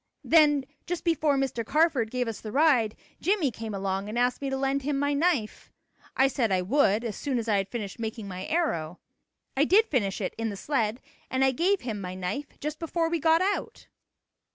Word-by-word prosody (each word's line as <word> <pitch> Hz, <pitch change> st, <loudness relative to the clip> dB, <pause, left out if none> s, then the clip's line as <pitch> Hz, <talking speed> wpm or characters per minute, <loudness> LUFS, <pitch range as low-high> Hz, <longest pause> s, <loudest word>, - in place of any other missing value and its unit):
Then 295 Hz, -4 st, +4 dB, 0.2 s
just 350 Hz, 0 st, -3 dB
before 310 Hz, -4 st, +2 dB
Mr. 265 Hz, -4 st, -1 dB
Carford 285 Hz, -3 st, +2 dB
gave 250 Hz, 0 st, -1 dB
us 225 Hz, -, -5 dB
the 215 Hz, -, -6 dB
ride, 260 Hz, -6 st, +3 dB, 0.3 s
Jimmie 355 Hz, -7 st, +2 dB
came 220 Hz, -2 st, -6 dB
along 195 Hz, +1 st, -2 dB
and 220 Hz, -, -4 dB
asked 245 Hz, +2 st, +1 dB
me 275 Hz, -, -2 dB
to 270 Hz, -, -1 dB
lend 270 Hz, +1 st, 0 dB
him 280 Hz, +1 st, -1 dB
my 285 Hz, +1 st, +1 dB
knife. 285 Hz, -7 st, 0 dB, 0.5 s
I 265 Hz, -, +5 dB
said 245 Hz, -5 st, 0 dB
I 185 Hz, -1 st, +2 dB
would 225 Hz, 0 st, +2 dB
as 225 Hz, -4 st, -3 dB
soon 275 Hz, -4 st, -2 dB
as 230 Hz, -1 st, -3 dB
I 210 Hz, -2 st, +3 dB
had 195 Hz, 0 st, -1 dB
finished 215 Hz, -3 st, -5 dB
making 220 Hz, -2 st, -4 dB
my 185 Hz, 0 st, -6 dB
arrow. 180 Hz, -, -1 dB, 0.6 s
I 275 Hz, -, +4 dB
did 400 Hz, +8 st, +5 dB
finish 205 Hz, -, -1 dB
it 190 Hz, -, -3 dB
in 225 Hz, 0 st, -1 dB
the 200 Hz, -, -6 dB
sled 235 Hz, -2 st, -1 dB, 0.3 s
and 260 Hz, +1 st, +2 dB
I 265 Hz, -, +4 dB
gave 365 Hz, +9 st, +1 dB
him 220 Hz, -5 st, -4 dB
my 180 Hz, -1 st, -5 dB
knife 190 Hz, +11 st, -5 dB
just 300 Hz, +1 st, -4 dB
before 330 Hz, 0 st, -1 dB
we 335 Hz, -, +1 dB
got 325 Hz, +3 st, +4 dB
out." 400 Hz, +1 st, -3 dB
260 Hz, 210 wpm, -27 LUFS, 215-300 Hz, 0.6 s, I